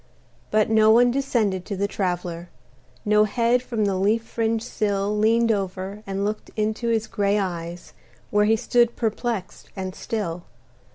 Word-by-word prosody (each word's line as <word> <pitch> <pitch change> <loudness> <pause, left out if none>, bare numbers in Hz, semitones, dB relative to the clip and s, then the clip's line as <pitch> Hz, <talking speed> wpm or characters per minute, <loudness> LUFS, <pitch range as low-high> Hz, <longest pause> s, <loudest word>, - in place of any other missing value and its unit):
But 215 0 +3
no 220 0 +5
one 240 +2 +6
descended 230 -8 0
to 205 - -4
the 200 +1 0
Traveler; 175 -3 -3 0.6
No 210 0 +4
head 235 +3 +2
from 230 -4 -1
the 200 - +1
leaf 210 +4 +1
fringed 225 0 -1
sill 205 -3 -1
Leaned 225 +2 +3
over 195 0 -3
and 195 +1 -2
looked 210 +1 -4
into 220 +2 -1
his 225 -1 +1
gray 205 -2 0
eyes, 175 -3 -4 0.4
Where 210 0 +3
he 220 +1 +4
stood 240 +1 +2
perplexed 225 -3 -3
and 190 -1 -4
still. 180 -7 -4
210 Hz, 155 wpm, -24 LUFS, 195-225 Hz, 0.6 s, one